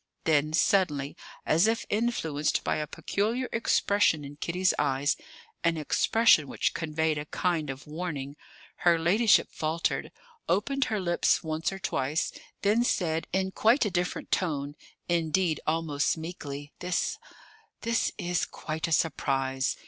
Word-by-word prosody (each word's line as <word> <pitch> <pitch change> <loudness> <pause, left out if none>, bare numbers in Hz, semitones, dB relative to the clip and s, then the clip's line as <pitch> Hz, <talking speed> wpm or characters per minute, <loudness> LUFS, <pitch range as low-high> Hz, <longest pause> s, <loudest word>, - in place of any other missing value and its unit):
Then, 155 -1 +2
suddenly, 155 -6 +2 0.3
as 165 +7 +4
if 225 +1 0
influenced 185 -10 0
by - - 0
a 150 - -3
peculiar 225 - -1
expression 200 -8 +2
in 140 +1 -9
Kitty's 180 +5 +1
eyes, 140 0 +1 0.5
an 170 -1 +2
expression 155 +1 +4
which - - -1
conveyed 160 -1 -1
a 150 - -5
kind 165 -4 -1
of 135 +1 -6
warning, 150 -3 -5 0.4
her 170 -1 +4
ladyship 200 +7 +4
faltered, 160 +2 -1 0.4
opened 270 +9 +1
her 215 -3 -1
lips 175 -2 +2
once 160 +2 -1
or 195 - -5
twice, 155 -4 -1 0.3
then 210 +4 +3
said, 165 -8 0
in 190 +1 0
quite 225 +6 +3
a 210 - -1
different 180 0 -2
tone, 145 -5 -1 0.3
indeed, 170 0 +1
almost 155 -1 +1
meekly: 145 -3 -7
"This 180 0 -1 0.6
this 230 -2 +1
is 175 0 -1
quite 155 +1 -4
a - - -5
surprise. 135 -4 0
165 Hz, 135 wpm, -28 LUFS, 150-190 Hz, 0.6 s, as